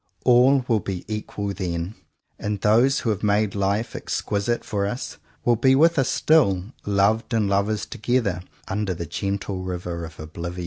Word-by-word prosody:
All 125 +1 +5
will 115 -3 +3
be 95 -3 -5
equal 105 -1 -4
then: 85 0 -3 0.5
and 105 -1 -2
those 120 +7 +4
who 115 - 0
have 105 -1 -3
made 105 -1 +2
life 100 +3 -1
ex - - -2
quisite 105 +4 -1
for 100 -2 -1
us 120 +5 -5 0.3
will 120 -1 +4
be 130 +3 +4
with 165 +2 +4
us 135 - +2
still, 100 - +3 0.2
loved 105 +3 +2
and 110 -3 +2
lovers 100 +2 0
together, 115 -6 -1 0.3
under 100 -1 -2
the 85 - -5
gentle 100 +2 -3
river 90 -2 -4
of 80 -1 -9
oblivion. 85 +3 -6
105 Hz, 170 wpm, -23 LUFS, 95-115 Hz, 0.5 s, All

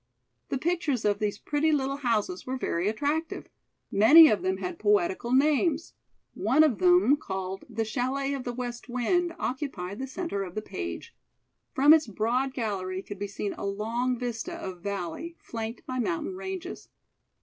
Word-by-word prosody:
The 270 - 0
pictures 310 -6 -1
of 205 -1 +2
these 210 -1 -1
pretty 300 +5 0
little 275 -2 0
houses 220 -8 -1
were 260 +1 -2
very 175 -7 -1
attractive. 295 +8 -2 0.4
Many 295 +11 +9
of 205 - +1
them 190 +1 0
had 185 -2 -5
poetical 205 +2 +1
names. 300 +4 +2 0.4
One 255 +11 +3
of 290 -8 +2
them, 355 -6 +5
called 190 -6 -5
"The 225 -1 -2
Chalet 265 +4 -1
of 270 -2 -4
the 245 - -3
West 245 0 -6
Wind," 335 +8 0
occupied 235 - -4
the 265 - -3
centre 270 - -3
of 180 -2 -8
the 215 - -2
page. 85 - -6 0.6
From 285 +3 +7
its 315 -5 +4
broad 245 +6 -1
gallery 190 -5 -3
could 205 -2 -8
be 205 - -3
seen 200 0 -4
a - - -8
long 230 +5 -1
vista 235 -2 -4
of 185 -2 -7
valley, 200 - -4
flanked 225 0 -6
by 255 0 -3
mountain 340 +6 -2
ranges. 380 -1 -6
245 Hz, 165 wpm, -28 LUFS, 205-290 Hz, 0.6 s, Many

